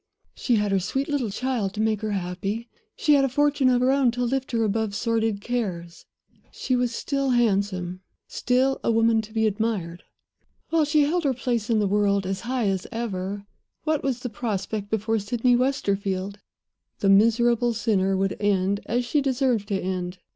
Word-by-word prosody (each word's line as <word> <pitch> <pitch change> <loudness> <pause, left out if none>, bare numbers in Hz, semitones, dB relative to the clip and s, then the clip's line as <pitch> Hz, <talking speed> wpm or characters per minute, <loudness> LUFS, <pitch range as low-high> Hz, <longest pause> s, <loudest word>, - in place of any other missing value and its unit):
She 245 - 0
had 210 -2 +1
her 195 - +3
sweet 265 +10 -2
little 280 -7 -1
child 225 -2 -2
to - - -5
make 215 -1 +1
her 215 - -2
happy; 195 +5 -3 0.3
she 300 - +3
had 280 -1 +5
a 270 - +2
fortune 290 0 +2
of 250 -1 +3
her 255 +1 +3
own 270 -2 +3
to 245 0 -2
lift 260 +2 -1
her 230 -2 +1
above 215 -1 -1
sordid 225 -2 0
cares; 185 -8 -4 0.4
she 255 - -1
was 245 -1 0
still 275 +3 -2
handsome, 195 -6 0 0.3
still 260 +2 +1
a - - +2
woman 225 0 +3
to 215 0 -12
be 220 0 +1
admired. 205 -5 -2 0.7
While 325 -2 +3
she 300 +1 +3
held 335 +4 0
her 270 -3 +1
place 235 -3 -2
in 230 - +3
the 210 - +2
world 200 -1 +1
as 190 +1 -2
high 245 -1 -1
as 190 -2 -1
ever, 200 -4 -4 0.4
what 310 -2 0
was 255 -3 -1
the 250 - -4
prospect 210 -2 -3
before 220 +1 0
Sydney 240 +4 +1
Westerfield? 200 -6 -1 0.6
The 195 - +1
miserable 235 +4 +4
sinner 195 -3 +1
would 195 0 0
end 200 -1 +1
as 245 +2 0
she 295 +5 +1
had 280 - -3
deserved 255 -5 +1
to 195 -2 -1
end. 180 -1 -3
225 Hz, 185 wpm, -24 LUFS, 200-250 Hz, 0.7 s, had